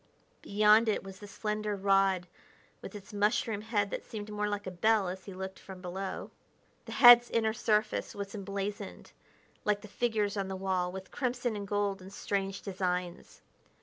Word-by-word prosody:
Beyond 215 +2 +5
it 215 - 0
was 195 0 -10
the 205 - -10
slender 210 0 -2
rod 195 -2 +3 0.6
with - - -9
its 205 +1 -10
mushroom 210 +1 +1
head 210 -3 0
that - - -4
seemed 210 -1 -7
more 210 0 -1
like 205 0 -3
a 185 - -4
bell 210 +2 +2
as 185 +1 -6
he 200 - -8
looked 190 0 -6
from 190 -1 -10
below. 190 +1 -5 0.5
The - - -7
head's 240 -1 +9
inner 220 -1 +1
surface 215 -2 0
was 200 -1 -5
emblazoned, 200 0 -5 0.5
like 210 -1 +1
the 215 - -10
figures 215 -2 0
on 195 -1 -1
the 190 - -4
wall, 185 -1 -1
with 190 0 -8
crimson 245 -3 -1
and 200 -1 -5
gold 205 -1 -1
in 185 - -10
strange 195 -1 -3
designs. 180 -2 -3
205 Hz, 175 wpm, -31 LUFS, 190-215 Hz, 0.6 s, head's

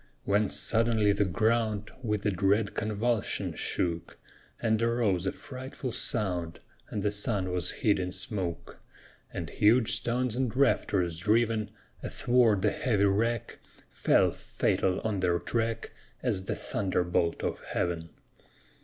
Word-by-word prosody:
When 105 0 +2
suddenly 110 -2 +3
the 100 0 +2
ground 110 +1 0
With 105 -3 -2
a 105 - +3
dread 100 +3 +1
convulsion 110 +2 -1
shook, 85 -1 -3 0.4
And 110 -1 +1
arose 115 -6 +1
a - - +1
frightful 130 0 -7
sound, 90 -7 -1 0.3
And 105 - -3
the 105 - +1
sun 100 -3 0
was 90 -1 -1
hid 105 -2 +1
in 90 -1 -2
smoke; 90 -4 -3 0.5
And - - -4
huge 110 +2 +4
stones 120 -1 +1
and 125 -2 -1
rafters, 90 -11 +2
driven 110 +2 +2 0.3
Athwart 120 -5 +2
the 105 - +3
heavy 110 -8 +1
rack, 115 +3 0 0.3
Fell, - - +3
fatal 90 -1 0
on 110 -3 -1
their 90 -2 +2
track 115 +3 -2 0.3
As 105 -7 -1
the - - -2
thunderbolt 90 -3 -1
of - - -2
Heaven. 85 -2 -2
105 Hz, 130 wpm, -29 LUFS, 95-115 Hz, 0.5 s, huge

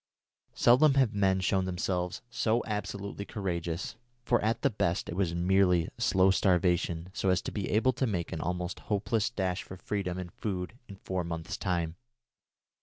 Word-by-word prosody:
Seldom 135 +4 +5
have 130 -5 +3
men 95 -2 +2
shown 95 0 +1
themselves 90 -1 -2
so 115 0 +1
absolutely 100 -1 -4
courageous, 90 -3 -3 0.3
for 120 0 +2
at 110 +2 0
the - - +3
best 85 -5 0
it 85 - -5
was 90 -3 0
merely 90 -1 +3
slow 95 -4 +4
starvation 90 -2 +1
so 95 - 0
as 95 - +3
to - - -4
be 100 -4 -3
able 120 +5 +3
to 130 - 0
make 90 -6 -2
an 80 - -3
almost 90 +1 -3
hopeless 105 +1 +1
dash 95 -5 -1
for 95 - -10
freedom 95 -1 -3
and 90 -2 -6
food 95 -2 -3
in 100 - -9
four 95 -1 -3
months' 85 -1 -4
time. 85 -3 -2
95 Hz, 170 wpm, -30 LUFS, 90-105 Hz, 0.3 s, Seldom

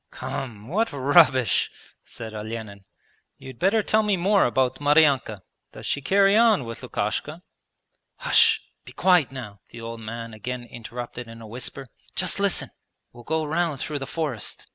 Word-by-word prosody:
'Come, 110 -5 -6
what 215 - 0
rubbish!' 135 - +4 0.3
said 110 -1 -9
Olenin. 105 -2 -7 0.5
'You'd 130 -3 -11
better 205 +4 +3
tell 215 +2 +3
me 210 -3 +1
more 195 +3 +3
about 130 +2 0
Maryanka. 145 -9 +3 0.3
Does - - -9
she 140 - -1
carry 195 +7 +4
on 220 - +5
with 115 0 -7
Lukashka?' 150 - -3 0.7
'Hush... 455 -3 +4 0.2
be - - -13
quiet 180 -8 +3
now!' 115 -7 -8
the 115 - -11
old 115 0 -6
man 115 +1 -6
again 120 +3 -5
interrupted 120 0 -8
in 115 0 -10
a 115 - -10
whisper: 125 +4 -6 0.3
'just - - 0
listen, - - +1 0.4
we'll 120 0 -13
go 160 +4 -1
round 160 -2 0
through 150 0 -3
the 135 - -5
forest.' 145 -10 -3
130 Hz, 155 wpm, -25 LUFS, 115-170 Hz, 0.7 s, on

